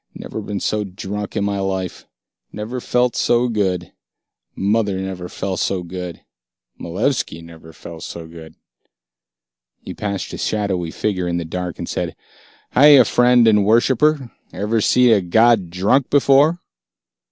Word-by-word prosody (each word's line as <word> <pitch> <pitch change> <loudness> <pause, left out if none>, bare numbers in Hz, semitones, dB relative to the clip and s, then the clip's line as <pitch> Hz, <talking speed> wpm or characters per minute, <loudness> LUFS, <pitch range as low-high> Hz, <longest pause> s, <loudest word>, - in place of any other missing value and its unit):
"Never - - -7
been 100 -1 -4
so 105 +2 -1
drunk 100 +1 -6
in - - 0
my 100 -1 -1
life. 95 -2 -4 0.4
Never 115 +4 -5
felt 125 0 +1
so 120 +1 +2
good. 95 -6 -1 0.6
Mother 105 -1 0
never 95 -2 -5
felt 95 -1 -4
so 95 -2 -1
good. 90 -1 -7 0.6
Malevski 95 - -2
never 80 -1 -13
felt 80 0 -11
so 85 -2 -7
good." 80 -1 -12 1.3
He - - -7
passed 100 -3 -4
a - - -6
shadowy 95 -5 -1
figure 90 0 -2
in 85 0 -1
the 85 - -3
dark 90 +1 -5
and - - -6
said, - - -3 0.6
"Hiya, 140 -1 +7
friend 120 +1 +4
and 105 -2 +4
worshipper. 130 +5 +2 0.2
Ever 110 +2 -1
see 125 +3 +4
a 105 -3 +4
god 110 +1 +3
drunk 100 +10 +1
before?" 145 +3 +4
100 Hz, 140 wpm, -19 LUFS, 90-120 Hz, 1.3 s, Hiya